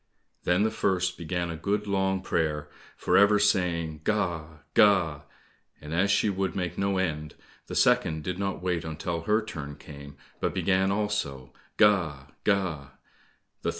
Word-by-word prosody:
Then 90 Hz, +3 st, +3 dB
the 110 Hz, -, +1 dB
first 90 Hz, -4 st, 0 dB
began 85 Hz, 0 st, -3 dB
a -, -, -4 dB
good 105 Hz, +5 st, -1 dB
long 95 Hz, -1 st, 0 dB
prayer, 75 Hz, -5 st, -1 dB, 0.3 s
for -, -, +2 dB
ever 100 Hz, +1 st, +6 dB
saying, 85 Hz, -6 st, +1 dB
"Ga! 85 Hz, -7 st, -2 dB
Ga!" 90 Hz, -9 st, +4 dB, 0.5 s
and 75 Hz, +1 st, -8 dB
as 95 Hz, +4 st, +2 dB
she 100 Hz, +2 st, +3 dB
would 95 Hz, -2 st, -1 dB
make 90 Hz, -3 st, -2 dB
no 100 Hz, 0 st, 0 dB
end, 75 Hz, -5 st, -2 dB, 0.3 s
the -, -, -6 dB
second 80 Hz, -1 st, +3 dB
did 90 Hz, +3 st, -4 dB
not 100 Hz, -2 st, -3 dB
wait 90 Hz, -2 st, 0 dB
until 80 Hz, +1 st, -3 dB
her 105 Hz, +6 st, +1 dB
turn 75 Hz, -8 st, -6 dB
came, 70 Hz, -1 st, -12 dB, 0.2 s
but -, -, -1 dB
began 95 Hz, 0 st, +2 dB
also, 85 Hz, -12 st, -2 dB, 0.2 s
"Ga! 85 Hz, -10 st, +3 dB
Ga!" 90 Hz, -9 st, 0 dB
90 Hz, 150 wpm, -27 LUFS, 80-100 Hz, 0.5 s, ever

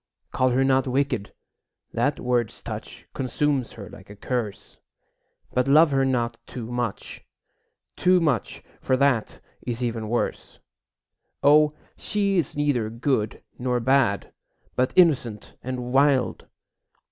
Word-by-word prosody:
Call 130 Hz, -, +2 dB
her 130 Hz, +2 st, +2 dB
not 135 Hz, 0 st, +2 dB
wicked; 130 Hz, -5 st, -1 dB, 0.6 s
that -, -, 0 dB
word's 120 Hz, -2 st, -1 dB
touch -, -, -8 dB
Consumes 135 Hz, 0 st, -1 dB
her 100 Hz, -3 st, -9 dB
like 95 Hz, -, -14 dB
a 105 Hz, -, -10 dB
curse; 110 Hz, -1 st, -4 dB, 0.8 s
But 125 Hz, +1 st, +1 dB
love 150 Hz, +2 st, +6 dB
her 135 Hz, -1 st, +2 dB
not 120 Hz, -3 st, 0 dB
too 120 Hz, -2 st, -7 dB
much, 120 Hz, -4 st, -4 dB, 0.7 s
too 185 Hz, 0 st, +4 dB
much, 145 Hz, -, -1 dB, 0.2 s
For 130 Hz, -, +1 dB
that 135 Hz, -5 st, +1 dB, 0.2 s
is 120 Hz, 0 st, -4 dB
even 115 Hz, -2 st, -2 dB
worse. 120 Hz, +1 st, -2 dB, 0.9 s
O, 150 Hz, +1 st, +5 dB, 0.2 s
she 200 Hz, -2 st, 0 dB
is 155 Hz, -, -3 dB
neither 140 Hz, -7 st, +1 dB
good 115 Hz, -2 st, -1 dB, 0.2 s
nor 125 Hz, 0 st, 0 dB
bad, 125 Hz, -4 st, +1 dB, 0.4 s
But 125 Hz, 0 st, +1 dB
innocent 135 Hz, -, +2 dB
and 125 Hz, -1 st, -5 dB
wild! 135 Hz, -2 st, +2 dB
125 Hz, 125 wpm, -24 LUFS, 120-140 Hz, 0.9 s, love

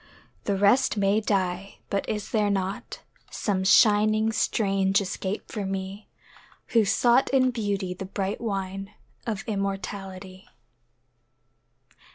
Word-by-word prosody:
The 200 Hz, -, +1 dB
rest 205 Hz, +4 st, +3 dB
may 200 Hz, +2 st, +2 dB
die 190 Hz, -2 st, -1 dB
but 200 Hz, -, -1 dB
is 210 Hz, -1 st, -3 dB
there 210 Hz, -2 st, +2 dB
not 195 Hz, 0 st, -3 dB, 0.3 s
Some 195 Hz, -3 st, -1 dB
shining 215 Hz, +2 st, +5 dB
strange 195 Hz, -2 st, +1 dB
escape 195 Hz, +1 st, -4 dB
for 210 Hz, -, -3 dB
me 195 Hz, +1 st, -5 dB, 0.6 s
Who 225 Hz, -3 st, +4 dB
sought 240 Hz, +5 st, +3 dB
in 255 Hz, -1 st, +3 dB
Beauty 200 Hz, -5 st, -2 dB
the 185 Hz, +1 st, -7 dB
bright 195 Hz, +2 st, -3 dB
wine 195 Hz, -2 st, -4 dB, 0.3 s
Of 215 Hz, -2 st, -2 dB
immortality? 195 Hz, -2 st, -5 dB
200 Hz, 115 wpm, -26 LUFS, 195-215 Hz, 0.6 s, shining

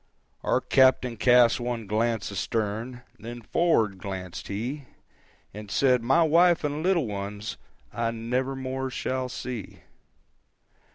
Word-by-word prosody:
Our -, -, +1 dB
captain 130 Hz, -2 st, +3 dB
cast 120 Hz, +1 st, +5 dB
one 120 Hz, -2 st, -3 dB
glance 110 Hz, 0 st, -1 dB
astern, 110 Hz, +5 st, -3 dB, 0.2 s
Then 120 Hz, +1 st, -8 dB
forward 110 Hz, -, +1 dB
glancèd 95 Hz, -3 st, -6 dB
he, 125 Hz, +8 st, -4 dB, 0.7 s
And 105 Hz, 0 st, -9 dB
said, 125 Hz, +2 st, +3 dB
"My 135 Hz, +8 st, +4 dB
wife 170 Hz, +2 st, +4 dB
and 150 Hz, +1 st, -2 dB
little 175 Hz, -4 st, +2 dB
ones 100 Hz, 0 st, -5 dB, 0.4 s
I 115 Hz, -1 st, -1 dB
never 125 Hz, +4 st, -2 dB
more 130 Hz, 0 st, -3 dB
shall 130 Hz, 0 st, -3 dB
see." 125 Hz, -4 st, -6 dB
120 Hz, 120 wpm, -26 LUFS, 105-130 Hz, 0.7 s, cast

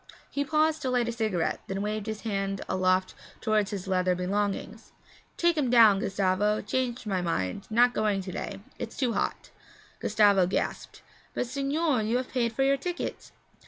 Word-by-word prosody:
He 285 Hz, -, 0 dB
paused 310 Hz, +1 st, +1 dB
to 260 Hz, -, -1 dB
light 245 Hz, -2 st, +1 dB
a -, -, 0 dB
cigarette, 215 Hz, -8 st, -1 dB
then 195 Hz, +1 st, -3 dB
waved 210 Hz, 0 st, -3 dB
his 220 Hz, -1 st, -4 dB
hand 195 Hz, -3 st, -2 dB
aloft 185 Hz, 0 st, +1 dB, 0.3 s
toward 215 Hz, -2 st, +1 dB
his 195 Hz, -2 st, -5 dB
leather 185 Hz, -1 st, +2 dB
belongings. 200 Hz, +3 st, -3 dB, 0.4 s
'Take 340 Hz, -2 st, +2 dB
'em 265 Hz, -4 st, +1 dB
down, 225 Hz, -5 st, +7 dB
Gustavo. 195 Hz, +2 st, +1 dB
Changed 245 Hz, +2 st, -2 dB
my 190 Hz, -3 st, -1 dB
mind; 165 Hz, -, -2 dB
not 240 Hz, +2 st, +4 dB
going 210 Hz, -3 st, +1 dB
to 185 Hz, -, -6 dB
day 195 Hz, +2 st, -5 dB, 0.2 s
it's 225 Hz, -, -6 dB
too 250 Hz, -4 st, +1 dB
hot.' -, -, -2 dB, 0.5 s
Gustavo 205 Hz, -4 st, +4 dB
gasped. 185 Hz, -, -3 dB, 0.3 s
'But, -, -, 0 dB
signore, 280 Hz, +1 st, 0 dB
you 220 Hz, +3 st, +1 dB
have 255 Hz, 0 st, -3 dB
paid 235 Hz, -3 st, 0 dB
for 250 Hz, +4 st, 0 dB
your 275 Hz, +1 st, +3 dB
ticket.' 350 Hz, +5 st, -5 dB
215 Hz, 170 wpm, -28 LUFS, 195-250 Hz, 0.5 s, down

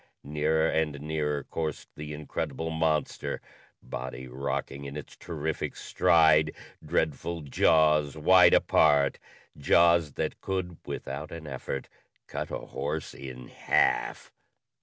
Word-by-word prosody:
Nearer 75 Hz, +2 st, +1 dB
and 80 Hz, -3 st, 0 dB
nearer 75 Hz, -1 st, -1 dB
coursed 80 Hz, -3 st, -4 dB
the 75 Hz, 0 st, -7 dB
incredible 75 Hz, +1 st, -4 dB
monster, 80 Hz, -1 st, -1 dB, 0.4 s
body 65 Hz, 0 st, -6 dB
rocking 70 Hz, +2 st, -4 dB
in 70 Hz, +1 st, -6 dB
its 75 Hz, -, -9 dB
terrific 80 Hz, -2 st, -4 dB
stride, 80 Hz, -2 st, +4 dB, 0.3 s
dreadful 85 Hz, +3 st, -1 dB
jaws 75 Hz, 0 st, +3 dB
wide 90 Hz, +3 st, +7 dB
apart 70 Hz, -3 st, +4 dB, 0.4 s
jaws 85 Hz, +1 st, +4 dB
that -, -, -3 dB
could, 95 Hz, -3 st, -3 dB
without 70 Hz, +3 st, -5 dB
an 85 Hz, -1 st, -8 dB
effort, 70 Hz, -1 st, -5 dB, 0.4 s
cut -, -, -5 dB
a -, -, -3 dB
horse -, -, -4 dB
in 65 Hz, -2 st, -9 dB
half. -, -, +1 dB
75 Hz, 115 wpm, -28 LUFS, 70-80 Hz, 0.4 s, wide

